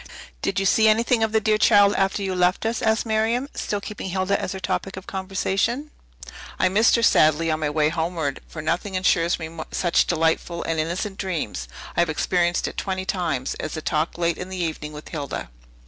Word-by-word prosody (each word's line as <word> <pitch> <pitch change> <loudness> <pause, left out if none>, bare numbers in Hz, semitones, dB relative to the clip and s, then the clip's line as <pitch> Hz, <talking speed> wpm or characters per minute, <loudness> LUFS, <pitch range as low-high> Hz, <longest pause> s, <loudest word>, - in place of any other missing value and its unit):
"Did - - 0
you 195 - -1
see 220 +3 +4
anything 230 +2 +3
of 220 -1 +1
the 220 - +3
dear 215 0 +2
child 205 -2 +6
after 195 +1 0
you 190 -1 -1
left 180 +3 +1
us?" 225 +1 -1
asked 220 +1 +2
Miriam, 225 +4 +1
still 205 - -2
keeping 200 -1 -6
Hilda 190 +2 0
as - - -3
her 190 - -5
topic 190 0 -3
of 190 - -8
conversation. 195 +8 -1 0.7
"I 185 - +3
missed 215 +5 +4
her 235 - +1
sadly 160 -5 +4
on 155 - -1
my 150 -2 0
way 150 0 +2
homeward; 160 -3 -2
for 160 - -7
nothing 180 +5 -1
insures 175 -2 +2
me 160 0 -8
such 175 -2 +2
delightful 165 +1 0
and 165 -1 -1
innocent 185 +5 -2
dreams 155 - -3 0.3
(I - - 0
have 170 -1 +3
experienced 175 +2 +1
it - - -7
twenty 190 -1 -2
times) 165 -10 -1
as 155 - -4
a - - -4
talk 155 +1 -1
late 170 -1 0
in 180 - -6
the 190 - -5
evening 160 -3 -3
with 150 0 -10
Hilda." 145 - -5
185 Hz, 205 wpm, -23 LUFS, 160-205 Hz, 0.7 s, child